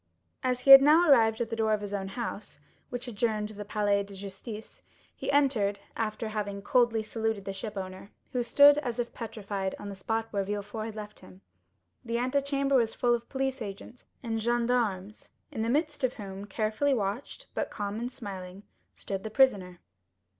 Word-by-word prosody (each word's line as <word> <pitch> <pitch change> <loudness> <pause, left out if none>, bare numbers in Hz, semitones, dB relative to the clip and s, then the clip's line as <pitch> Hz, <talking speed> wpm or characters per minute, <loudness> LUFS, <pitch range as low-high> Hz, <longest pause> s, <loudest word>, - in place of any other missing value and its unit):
0097m 255 - +1
As 250 -1 0
he 275 - +5
had 270 0 +13
now 315 +5 +6
arrived 225 -5 +5
at 235 - -2
the - - -1
door 220 -1 +1
of 210 - 0
his 205 -1 -5
own 195 -1 -2
house, 210 - -6 0.3
which 245 +1 -5
adjoined 215 -2 -1
the 210 -1 -7
Palais 205 -1 +1
de 200 0 -9
Justice, 200 +3 -8 0.3
he - - -3
entered, 240 -9 +2 0.2
after 220 0 -2
having, 205 -2 -4
coldly 235 -1 +3
saluted 220 -2 -2
the 195 - -3
shipowner, 195 -1 -6 0.2
who 250 - 0
stood, 285 +4 +6
as 245 -5 -4
if 240 -1 -3
petrified, 200 -4 -4
on 205 - -7
the 200 - -6
spot 225 +4 -2
where 200 -1 +1
Villefort 205 +2 -4
had 220 - -7
left 210 -1 -8
him. 95 0 -15 0.6
The 235 0 -2
antechamber 275 +2 +1
was 230 -2 +1
full 240 -1 +2
of 235 0 -3
police 265 -1 -2
agents 210 +4 -8 0.2
and 225 -2 -2
gendarmes, 230 -4 0 0.2
in 220 - -4
the 225 - 0
midst 290 +1 0
of 255 -1 +1
whom, 195 -2 -7
carefully 220 +7 0
watched, 220 - -3
but - - -2
calm 205 0 -4
and 245 +2 -3
smiling, 195 -5 -8 0.3
stood 195 -1 -4
the 220 - -4
prisoner. 200 -8 +2
220 Hz, 185 wpm, -29 LUFS, 200-245 Hz, 0.6 s, had